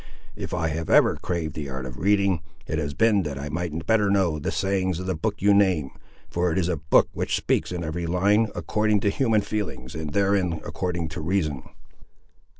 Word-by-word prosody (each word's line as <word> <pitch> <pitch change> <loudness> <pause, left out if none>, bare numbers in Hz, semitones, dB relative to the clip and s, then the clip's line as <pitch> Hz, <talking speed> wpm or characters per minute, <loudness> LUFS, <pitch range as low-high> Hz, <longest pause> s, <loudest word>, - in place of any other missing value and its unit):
If - - -6
I 85 -2 0
have 80 0 -4
ever - - +5
craved 85 -5 -3
the 75 -3 -5
art 65 -1 -5
of 60 -1 -8
reading, 100 -1 +2 0.2
it 80 - -2
has 70 -2 -3
been 110 -1 +4
that 75 -5 -4
I 70 +2 -5
might 80 0 -3
better 105 -1 +3
know 95 -6 +2
the - - -2
sayings 95 -2 0
of 90 - -5
the 95 - 0
book 100 +5 -3
you 100 0 +6
name, 95 -9 +3 0.4
for 90 0 0
it 80 - -1
is 90 -3 +1
a 90 -3 0
book 75 +1 +3
which - - -1
speaks, - - 0
in 90 -1 -3
every 85 +2 -3
line, 100 +6 +3
according 105 -1 +1
to 100 - +2
human 115 -3 +2
feelings, 100 -12 -4
and 80 -2 -5
therein 100 -1 +2
according 85 -3 -3
to 80 +1 -6
reason." 75 -5 -1
90 Hz, 205 wpm, -25 LUFS, 80-100 Hz, 0.4 s, you